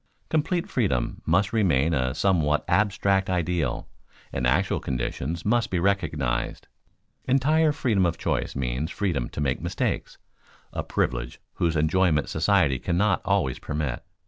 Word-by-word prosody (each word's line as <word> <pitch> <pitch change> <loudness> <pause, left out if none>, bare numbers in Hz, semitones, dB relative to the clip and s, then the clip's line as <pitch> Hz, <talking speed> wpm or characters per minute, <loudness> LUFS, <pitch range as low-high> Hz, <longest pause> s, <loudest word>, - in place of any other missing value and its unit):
_ - - -40
Complete 165 +3 0
freedom 70 - -1
must 95 +6 +2
remain 85 - +2
a 65 -2 0
somewhat 80 -4 +2
abstract 100 -2 +2
ideal, 85 -6 -1 0.5
and 60 -2 0
actual 60 - +2
conditions 65 +6 -3
must 115 +1 +2
be 90 - -1
recognized. 80 -10 -1 0.6
Entire 150 +4 +3
freedom 115 - +1
of 85 -1 -2
choice - - -2
means 65 +3 -2
freedom 85 - -1
to - - -7
make 70 -3 0
mistakes, - - -2 0.6
a - - -2
privilege - - -2 0.2
whose 85 -1 +2
enjoyment 80 0 +2
society 80 -5 +2
cannot 95 +6 +1
always 95 -10 0
permit. 75 -4 -3
85 Hz, 135 wpm, -25 LUFS, 70-100 Hz, 0.6 s, Entire